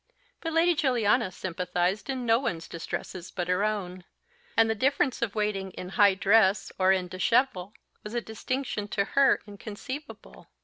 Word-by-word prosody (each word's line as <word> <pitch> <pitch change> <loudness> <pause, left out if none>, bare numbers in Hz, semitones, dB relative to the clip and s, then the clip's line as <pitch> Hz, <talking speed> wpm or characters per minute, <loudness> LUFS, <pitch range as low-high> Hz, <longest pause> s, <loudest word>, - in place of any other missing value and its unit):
But 325 -1 -3
Lady 335 +2 +4
Juliana 240 - +2
sympathised 180 +3 -2
in 260 -2 -2
no 230 0 +4
one's 165 -11 -3
distresses 170 +1 -6
but 175 -2 -4
her 180 +2 +1
own, 185 -4 -2 0.5
and 225 0 +6
the 220 - +1
difference 265 +3 +1
of 225 -3 -1
waiting 210 -3 -1
in 180 - -7
high 200 0 +4
dress 200 0 +3
or 185 0 +5
in 185 -1 +1
déshabille 195 +1 +1 0.3
was 210 +3 -7
a - - +2
distinction 220 -1 -4
to 200 -1 0
her 275 +4 +3
inconceivable. 215 +8 -9
210 Hz, 160 wpm, -27 LUFS, 185-245 Hz, 0.5 s, and